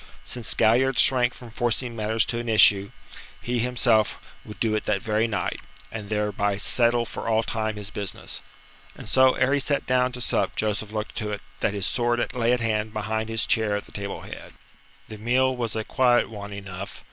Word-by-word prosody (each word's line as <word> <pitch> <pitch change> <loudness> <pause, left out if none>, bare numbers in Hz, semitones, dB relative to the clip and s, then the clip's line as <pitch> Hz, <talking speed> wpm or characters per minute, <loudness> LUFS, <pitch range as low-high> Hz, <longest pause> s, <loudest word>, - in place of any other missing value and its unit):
Since 120 -2 -3
Galliard 120 +3 +3
shrank 125 -2 +4
from 120 -2 -12
forcing 120 +1 -1
matters 110 +1 +1
to 120 - -2
an 120 0 -4
issue, 100 -2 +6 0.5
he 120 0 -2
himself 120 -3 +2 0.2
would 105 - -11
do 110 -2 +1
it 110 - -1
that 105 -2 +1
very 110 +2 0
night, 110 - -2 0.3
and 105 -2 -7
thereby 105 -1 0
settle 120 +3 +2
for - - -6
all 110 0 +2
time 110 -1 -2
his 105 -1 -6
business. 100 -2 -4 0.5
And - - -8
so 130 0 +5
ere 130 +2 +2
he 145 - +3
sat 140 +1 0
down 125 0 +2
to 125 - -5
sup 125 - 0
Joseph 105 0 -2
looked 110 0 -4
to 105 - -2
it 105 - -4 0.2
that 105 - 0
his 100 -2 0
sword 120 +1 0
lay 120 -2 +1
at 125 -1 +1
hand 110 -1 -1
behind 110 +1 -2
his 115 0 0
chair 110 -3 +1
at 105 - -4
the - - -17
table 100 -1 -5
head. - - -10 0.5
The 110 -1 -9
meal 130 +4 +2
was 115 -3 -3
a 110 - -1
quiet 125 +1 +2
one 105 -1 -7
enough. 100 -1 -7
110 Hz, 200 wpm, -25 LUFS, 105-120 Hz, 0.5 s, issue